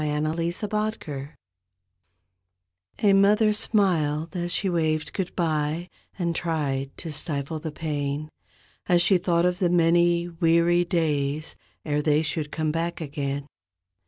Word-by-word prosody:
39 155 +3 0
TWO 210 +4 -2
MOTHERS 210 -11 -3 1.8
A 200 -1 +6
mother 210 +2 +4
smiled 170 -7 +1
as 175 0 -2
she 195 - +1
waved 155 -3 0
goodbye 165 -2 -1 0.3
And 170 -3 -1
tried 145 -6 -1
to 165 - -6
stifle 150 0 -3
the 160 0 -5
pain 150 -1 -3 0.6
As 175 -1 +4
she 190 -1 +4
thought 175 -1 +2
of 180 0 +1
the 180 -3 +2
many 170 0 +3
weary 170 +1 +3
days 155 -3 -1 0.3
Ere 150 0 0
they 150 +1 +2
should 155 -1 -2
come 155 -1 -1
back 165 +2 -2
again. 140 -2 -3
165 Hz, 130 wpm, -25 LUFS, 150-175 Hz, 1.8 s, A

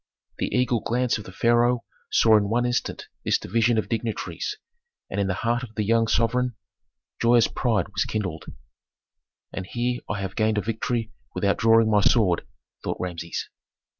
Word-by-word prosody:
The - - 0
eagle 125 -2 +1
glance 120 +1 0
of 105 - -9
the - - -9
pharaoh 120 +4 +2 0.3
saw 110 -1 +5
in 100 -1 +2
one 120 +2 +1
instant 120 0 -2 0.2
this - - +2
division 115 0 +1
of 110 - 0
dignitaries, 115 -1 -3 0.5
and 100 - 0
in 100 - 0
the 95 - 0
heart 120 +1 +2
of 115 -3 -9
the 105 - 0
young 115 +2 +2
sovereign 120 +2 +1 0.7
joyous 120 0 +5
pride 110 -8 0
was - - -1
kindled. 95 -7 -3 1.1
"And 95 -1 -5
here 120 +2 -2
I 105 - -2
have 95 -1 -4
gained 110 -1 +1
a - - +2
victory 115 +2 -2 0.2
without 100 -1 +1
drawing 115 -1 +4
my 105 -1 +4
sword," 95 -4 +3 0.4
thought - - -2
Rameses. 85 -2 -4
115 Hz, 165 wpm, -25 LUFS, 105-120 Hz, 1.1 s, saw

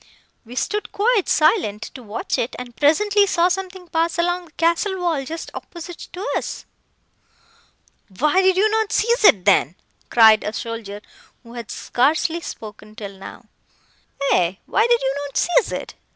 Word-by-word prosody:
We 240 +2 -11
stood 420 +10 -2
quite 425 -1 +1
silent, 260 - +2
to 260 - -10
watch 220 0 -3
it, 235 - -2
and 245 -1 -9
presently 405 +7 +3
saw 350 -1 +2
something 375 -1 -4
pass 330 0 0
along 350 +1 0
the 320 - -20
castle 340 +4 0
wall 335 -6 0
just 325 +4 -7
opposite 345 0 -9
to 380 +6 -5
us!" - - -4 1.5
"Why 300 +8 +3
did 375 -1 +3
you 415 +3 +4
not 440 -1 0
seize 470 +1 +1
it, 195 - +6
then?" 185 -5 +3 0.3
cried 220 -2 +6
a 210 - -3
soldier, 225 -3 -6 0.4
who 235 -1 -14
had 235 -3 -8
scarcely 315 +6 0
spoken 215 -5 -10
till 200 -3 -8
now. 195 0 -11 0.9
"Aye, 180 +1 +2
why 440 +3 +2
did 475 0 +3
you 265 +1 0
not 280 - -6
seize 355 +7 +2
it?" - - -5
325 Hz, 160 wpm, -21 LUFS, 230-380 Hz, 1.5 s, it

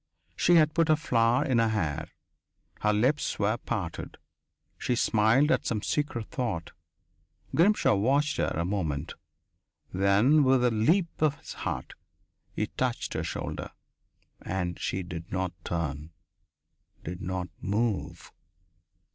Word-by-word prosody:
She 175 - +4
had 155 -2 +5
put 165 -1 +2
a 155 - +6
flower 120 -6 +2
in 125 -4 +2
her 115 - +3
hair. 90 -10 -1 0.7
Her 105 - +2
lips 125 +8 +1
were 105 +2 +1
parted. 105 -9 -5 0.6
She 125 - 0
smiled 115 +6 +3
at - - +1
some 105 -3 -1
secret 135 -7 -2
thought. 110 -11 -3 0.8
Grimshaw 195 - +4
watched 135 +9 +2
her - - +1
a 85 +2 -1
moment; 85 -7 -2 0.8
then 100 +11 +4
with 130 -1 +4
a 125 - +3
leap 165 - +1
of 150 -2 +3
his - - -9
heart - - -4 0.6
he - - 0
touched - - -2
her - - -2
shoulder. - - -4 0.7
And 90 -2 -3
she 95 - -2
did 85 -1 -8
not 95 -1 -1
turn, 75 -3 -3 0.9
did 90 0 -6
not 90 -1 -3
move.... 105 +1 -2
110 Hz, 130 wpm, -28 LUFS, 95-135 Hz, 0.9 s, a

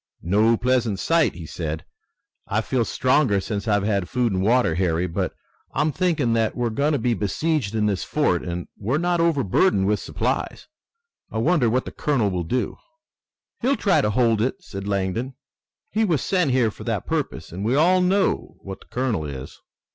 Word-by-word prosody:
"No 110 +6 +3
pleasant 120 -4 +1
sight," 165 - +2
he 85 -1 -8
said. 80 0 -5 0.6
"I 110 +2 0
feel 125 +1 0
stronger 130 -5 +2
since 105 +2 -4
I've 105 -2 +2
had 100 -3 0
food 120 -4 0
and 95 - 0
water, 115 -3 +3
Harry, 85 0 +1
but 85 -2 -2 0.4
I'm 150 +3 +2
thinking 155 -9 +1
that 115 -1 +1
we're 120 -2 -1
going 145 +7 +1
to - - +2
be 125 -3 +1
besieged 115 +2 -1
in 105 -1 +1
this 100 -3 0
fort, 145 - +1
and 85 0 -5
we're 120 +8 -1
not 175 +1 +1
overburdened 140 - +2
with 105 +1 +1
supplies. - - -3 0.6
I - - -5
wonder 130 0 +3
what 125 +3 0
the - - -6
colonel 120 -9 0
will 90 -1 -2
do." 125 +8 -2 0.8
"He'll 275 +2 +2
try 200 - +3
to 105 - +1
hold 115 -1 +2
it," 125 - 0
said 100 0 -7
Langdon. 100 +6 -2 0.6
"He 220 +2 +1
was 165 - +1
sent 180 -6 +1
here 125 -4 +2
for - - -11
that - - -2
purpose, - - -3
and 95 +4 -5
we 115 +5 +1
all 180 +5 +4
know 190 +2 +1
what 95 -1 -8
the - - -19
colonel 125 -9 -1
is." 70 -2 -7
115 Hz, 185 wpm, -23 LUFS, 100-145 Hz, 0.8 s, all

